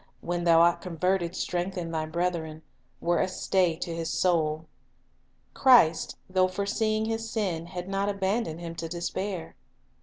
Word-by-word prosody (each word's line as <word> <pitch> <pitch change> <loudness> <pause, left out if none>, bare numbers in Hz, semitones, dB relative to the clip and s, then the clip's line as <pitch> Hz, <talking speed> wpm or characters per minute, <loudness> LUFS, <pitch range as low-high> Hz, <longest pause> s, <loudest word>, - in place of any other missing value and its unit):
when 175 0 -2
thou 165 -1 +6
art 170 0 +4
converted, 180 0 -1
strengthen 180 0 -2
converted" 165 0 -6
thy 155 -1 -2
brethren," 165 -2 -2 0.4
were 175 0 +1
a - - +2
stay 185 -2 +1
to 170 0 -5
his 165 0 -3
soul. 160 -3 +1 0.9
Christ, 240 -12 +5
though 185 0 +3
foreseeing 215 +3 -1
his 225 0 -3
sin, 185 -8 -2
had 180 +1 -6
not 195 +1 -1
abandoned 195 -3 -1
him 165 -1 -5
to 165 - -4
despair. 170 - -4
175 Hz, 150 wpm, -27 LUFS, 165-195 Hz, 0.9 s, thou